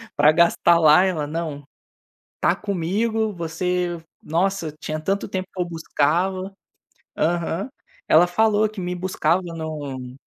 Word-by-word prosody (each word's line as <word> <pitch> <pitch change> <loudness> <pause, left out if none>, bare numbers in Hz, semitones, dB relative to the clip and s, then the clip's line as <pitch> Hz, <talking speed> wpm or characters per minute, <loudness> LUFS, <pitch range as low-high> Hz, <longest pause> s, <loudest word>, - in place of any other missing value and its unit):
pra 150 +1 +6
gastar 170 +1 +4
lá", 155 +3 +6
ela: 175 -6 0
"Não, 155 -2 -4 0.8
tá 180 - +3
comigo, 210 +4 -1
você" 175 +1 -2 0.2
nossa, 170 -1 -1
tinha 155 0 -4
tanto 195 +5 -1
tempo 185 -1 -3
que 185 - -3
eu - - 0
buscava 175 +4 -1 0.7
Aham. 170 +6 -1 0.4
Ela 165 +3 +7
falou 215 +3 +2
que 215 -2 -9
me 180 0 -3
buscava 180 -1 0
no 145 -6 -6
175 Hz, 130 wpm, -22 LUFS, 160-190 Hz, 0.8 s, Ela